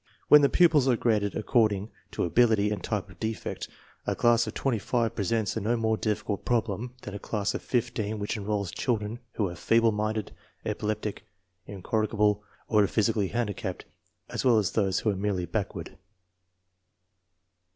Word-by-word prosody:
When 150 - +9
the 140 - +4
pupils 160 -7 +4
are 125 - +4
graded 105 -4 +1
according 110 -2 +1 0.2
to - - -2
ability 105 +2 +3
and 105 - -3
type 105 -2 -3
of 90 - -17
defect, 110 0 -4 0.4
a - - +1
class 120 0 +3
of - - -6
twenty 125 -5 0
five 115 +2 0
presents 110 +1 -1
a - - -2
no 115 +4 +1
more 110 -1 +1
difficult 105 -2 -2
prob 120 -2 +1
lem 120 +5 -5
than 105 - -7
a 100 - -5
class 105 -1 -2
of - - -3
fifteen 110 -3 -1
which 105 +2 -3
enrolls 100 -3 -2
children 115 -1 -2
who 105 - 0
are 90 - -6
feeble 115 +5 +3
minded, 110 0 -2 0.3
epileptic, 105 -1 -3 0.4
incorrigible, 105 +1 0 0.3
or 105 -3 +4
physically 110 -2 +1
handicapped 105 -4 -3 0.4
as - - -3
well 125 -3 +5
as 105 -4 +1
those 100 -4 +1
who 110 - +2
are - - -3
merely 95 -2 -1
back 100 +4 -3
ward. - - -7
110 Hz, 170 wpm, -28 LUFS, 100-115 Hz, 0.4 s, When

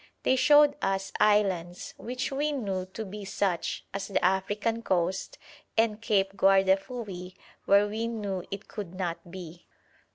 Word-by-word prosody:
They 260 - +3
showed 290 +2 +6
us 195 0 -1
islands, 190 -5 +2
which 250 +3 -4
we 290 +2 0
knew 195 -9 -2
to 215 +4 -6
be 205 +1 -7
such, 190 -3 -1
as 195 0 -3
the 195 -3 0
African 205 +5 0
coast, 185 -2 -1 0.4
and 220 -1 +2
Cape 195 -4 +1
Guardafui 195 0 +1 0.3
where 200 +1 +5
we 220 +2 -2
knew 205 -5 -3
it 200 +1 -6
could 195 -5 -7
not 175 -2 -4
be. 175 -2 -10
195 Hz, 140 wpm, -28 LUFS, 185-225 Hz, 0.4 s, showed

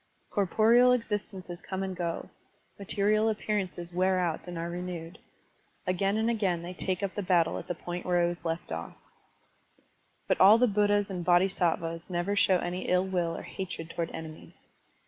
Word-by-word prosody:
Cor 200 -3 +1
poreal 240 +5 +5
existences 200 -6 -4
come 190 0 -4
and 190 -1 -4
go, 170 -1 -4 0.5
material 210 +2 +2
appear 215 0 -1
ances 175 -2 -4
wear 185 +1 +2
out 175 -1 -1
and 175 -1 -6
are 165 +1 -3
renewed. 175 +1 -6 0.7
Again 195 +3 +1
and 220 +1 +1
again 195 -7 0
they 175 +1 -6
take 185 +1 -2
up 195 - -1
the 205 - -3
battle 180 -3 +2
at - - -10
the 180 - -2
point 175 +1 -5
where 175 -1 +2
it - - +2
was 175 0 -5
left 165 0 -3
oflE. 80 +1 -5 1.3
But - - +1
all 200 +4 +9
the 250 - +4
Buddhas 205 -2 +2
and 180 -2 -3
Bodhisattvas 175 -2 +1
never 180 +3 -1
show 190 -2 +4
any 175 +1 -3
ill 180 +1 +3
will 175 -3 -1
or - - -7
hatred 180 -4 -6
toward 170 -1 -3
enemies. 160 -1 -10
185 Hz, 180 wpm, -29 LUFS, 175-200 Hz, 1.3 s, all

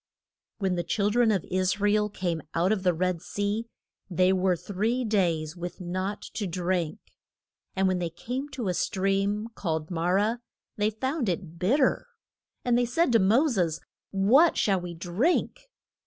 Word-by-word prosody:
When 190 -4 0
the 175 -1 -1
chil 205 +2 0
dren 240 0 +3
of 195 -5 0
Is 185 +1 +1
ra 205 0 +3
el 210 0 +2
came 175 -5 -2
out 175 +4 +2
of 215 -3 +1
the 185 -1 +3
Red 180 0 -1
Sea 205 +4 -2 0.4
they 185 +1 +3
were 185 -1 +2
three 220 +8 -1
days 170 -7 0
with 175 0 -6
naught 185 +3 -3
to 210 -3 -2
drink. 175 0 -1 0.8
And 190 0 +2
when 185 -1 +1
they 170 -1 -2
came 250 - -5
to 260 -6 -4
a 180 - +1
stream, 195 +4 0
called 160 -5 -3
Ma 170 0 -1
rah, 205 +5 +2 0.4
they 210 0 +1
found 260 +3 -2
it 170 -2 -4
bitter. 260 - +2 0.6
And 245 -1 +3
they 245 - +2
said 280 +4 +2
to 230 - +5
Mo 225 +11 +4
ses, 175 - 0 0.3
What 235 - +4
shall 195 -3 +2
we 175 -1 -6
drink? 230 - -1
195 Hz, 170 wpm, -27 LUFS, 180-220 Hz, 0.8 s, to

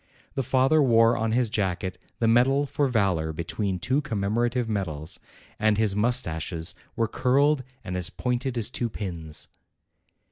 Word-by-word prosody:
The 135 - -1
father 135 +5 +3
wore 115 -3 +5
on 115 -1 0
his 125 0 +2
jacket 95 -3 -2 0.2
the 115 - +1
medal 130 +5 +4
for 145 0 0
valor 95 -10 +1
between 90 +4 -2
two 130 +10 0
commemorative 120 0 0
medals, 85 -8 -3 0.4
and 110 -1 +3
his 105 -3 +2
moustaches 90 - 0 0.2
were 115 -3 +1
curled 135 +4 +2 0.2
and 90 - -5
as 90 -1 0
pointed 125 0 -2
as 115 +1 0
two 120 -2 -2
pins. 85 -8 -5
115 Hz, 145 wpm, -26 LUFS, 95-125 Hz, 0.4 s, wore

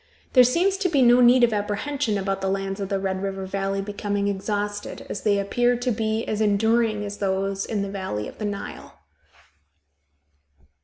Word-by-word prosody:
There 255 - +8
seems 355 +10 +2
to 385 -2 0
be 280 -5 +3
no 245 +1 +6
need 245 +1 +6
of 235 -2 +4
apprehension 210 +3 -1
about 195 0 -2
the 190 - 0
lands 195 0 -2
of 195 -1 -4
the 195 -1 0
Red 190 -1 -2
River 195 -1 -3
Valley 195 +1 -2
becoming 205 0 -2
exhausted, 205 +1 -3
as - - -4
they 205 -1 +2
appear 240 +5 +1
to 245 +1 -1
be 220 0 -1
as 215 0 -2
enduring 215 +1 +2
as 205 0 -7
those 195 0 -1
in 210 -3 -1
the - - -3
valley 185 - -4
of - - -12
the 215 - -3
Nile. 205 -1 -6
205 Hz, 185 wpm, -24 LUFS, 195-230 Hz, -, There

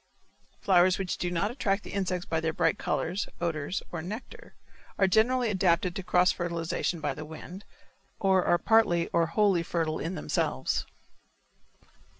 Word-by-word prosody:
Flowers 185 -1 +4
which 190 -2 -2
do 175 - -1
not 180 +5 -1
attract 205 -5 -1
the - - -9
insects 185 -3 -2
by 160 - -1
their 160 0 -1
bright - - +1
colors, 195 +3 -1
odor, 155 -4 -2 0.2
or 170 - -4
nectar, 210 +9 -8 0.4
are 195 - +4
generally 230 +4 +3
adapted 180 -2 +1
to - - -3
cross 180 0 +3
fertilization 170 0 -2
by 145 -3 -2
the 155 - -7
wind 160 +5 -10 0.5
or 190 -2 +3
are 175 - +3
partly 175 -6 +3
or 165 -1 +2
wholly 195 0 +2
fertile 165 -2 -2
in 170 +3 -3
themselves. - - -1
180 Hz, 155 wpm, -28 LUFS, 170-195 Hz, 0.5 s, Flowers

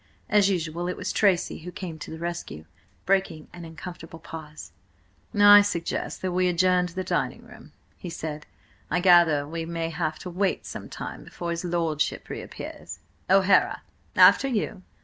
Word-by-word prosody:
As 205 -2 +4
usual, 175 -2 -2
it 180 - -3
was - - -3
Tracy 195 -5 +2
who 175 +2 -8
came 175 -4 -7
to - - -8
the 160 - -7
rescue, 170 - -5 0.4
breaking 190 -5 0
an 175 -1 -9
uncomfortable 165 0 -9
pause. 150 - -10 0.7
"I 205 0 +10
suggest 175 -4 -3
that 185 - -1
we 180 +1 +2
adjourn 180 0 +3
to 175 - -13
the 185 - -2
dining 185 - -2
room," - - -15 0.3
he 180 - -7
said. 155 -2 -6 0.4
"I 175 - +1
gather 170 -5 +5
we 165 +2 -4
may 165 0 -3
have 155 -1 -2
to - - -4
wait 190 +2 -1
some - - -7
time - - -7
before 170 -1 -6
his 170 +1 -3
lordship 165 -3 -1
reappears. - - -8 0.3
O'Hara, 195 0 +4 0.3
after 275 - +7
you!" 215 -6 -2
175 Hz, 165 wpm, -26 LUFS, 160-185 Hz, 0.7 s, I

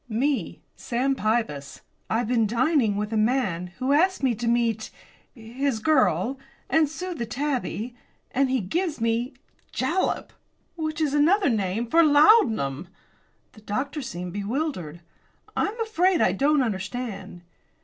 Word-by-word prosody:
"Me, 240 - -1
Sam 255 +3 -1
Pybus. 205 - -2 0.3
I've 225 +1 0
been 230 -2 +2
dining 240 -1 +2
with 210 +2 -3
a - - +1
man, 215 -6 +1
who 260 +1 -1
asked 370 +2 +2
me 260 -3 +3
to 230 +2 -4
meet 230 -2 +1 0.5
his 245 +2 -2
girl 265 0 +2 0.3
and 315 -2 +4
smooth 355 +2 -6
the 235 - -2
tabby 250 -2 -3 0.4
and 270 0 +1
he 260 -2 +1
gives 320 - -2
me 230 +3 -1 0.4
jalap, 320 +9 -1 0.4
which 315 -1 -3
is 295 -3 +1
another 335 +5 +4
name 210 0 -1
for 330 +8 +5
laudanum." 290 - +4 0.6
The 215 - -17
doctor 265 +8 -3
seemed 180 -7 -6
bewildered. 205 - -3 0.5
"I - - +1
am 440 +3 -7
afraid 375 -5 +2
I - - +4
don't 280 +7 +2
understand." 195 -3 -5
245 Hz, 140 wpm, -25 LUFS, 215-295 Hz, 0.6 s, for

